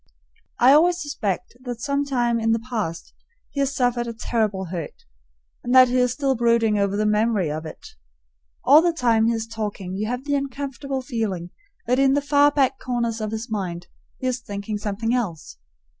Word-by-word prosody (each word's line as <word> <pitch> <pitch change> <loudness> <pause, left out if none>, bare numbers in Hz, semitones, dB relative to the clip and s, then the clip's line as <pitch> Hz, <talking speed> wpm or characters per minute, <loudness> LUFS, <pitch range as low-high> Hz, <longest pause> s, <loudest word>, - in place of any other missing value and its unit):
I 255 +3 +6
always 345 +4 +4
suspect 230 - -3
that 245 -2 -5
sometime 265 -4 0
in 225 0 +2
the 225 +1 -2
past 165 -8 -3 0.4
he 280 - -5
has 275 0 0
suffered 245 -1 +1
a 230 - -4
terrible 215 -4 -1
hurt, 170 -5 -6 0.6
and 245 +1 0
that 255 -1 +8
he 250 - +1
is 250 -1 +3
still 270 +1 0
brooding 230 -3 +2
over 200 0 0
the 215 - +1
memory 210 -5 +1
of 155 +1 -5
it. - - -11 0.7
All 290 +5 +7
the 345 0 +2
time 230 -7 +2
he 235 - +2
is 225 -1 -2
talking 210 -4 -5
you 210 +2 -2
have 250 +2 -3
the 285 0 -2
uncomfortable 275 -1 -3
feeling 215 -9 -3 0.3
that 250 +2 +1
in 270 0 +4
the 285 - +3
far 285 0 +4
back 280 -3 +1
corners 235 -3 -2
of 215 - -2
his 220 +2 -4
mind 175 -5 -3 0.3
he - - -7
is 255 -1 0
thinking 205 -2 -5
something 215 +3 -2
else. 170 - -3
235 Hz, 190 wpm, -23 LUFS, 210-265 Hz, 0.7 s, that